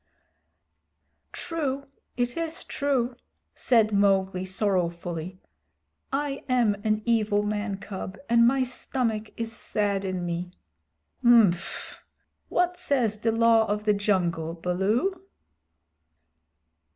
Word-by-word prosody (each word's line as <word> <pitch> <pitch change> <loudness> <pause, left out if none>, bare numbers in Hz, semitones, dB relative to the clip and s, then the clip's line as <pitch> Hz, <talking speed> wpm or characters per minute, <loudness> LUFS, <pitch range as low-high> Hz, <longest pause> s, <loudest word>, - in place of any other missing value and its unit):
"True, 280 -5 -3 0.3
it 245 -1 0
is 330 0 -3
true," 260 -4 -1 0.4
said 225 -4 +2
Mowgli 195 -2 +2
sorrowfully. 180 -2 -2 0.7
"I 280 0 -2
am 240 -4 +3
an 215 -1 0
evil 215 -3 +2
man 210 -1 -2
cub, 190 -1 -7
and 235 0 +5
my 265 +1 +3
stomach 235 -3 -2
is 230 -1 -2
sad 200 -2 -1
in 185 -2 -3
me." 175 +1 -4 0.7
"Mf! 225 -8 +3 0.5
What 360 0 +1
says 250 - 0
the 225 +1 +1
Law 225 -1 +4
of 210 +1 -1
the 210 - +4
Jungle, 175 -5 0
Baloo?" 200 - 0
215 Hz, 105 wpm, -26 LUFS, 190-245 Hz, 0.7 s, and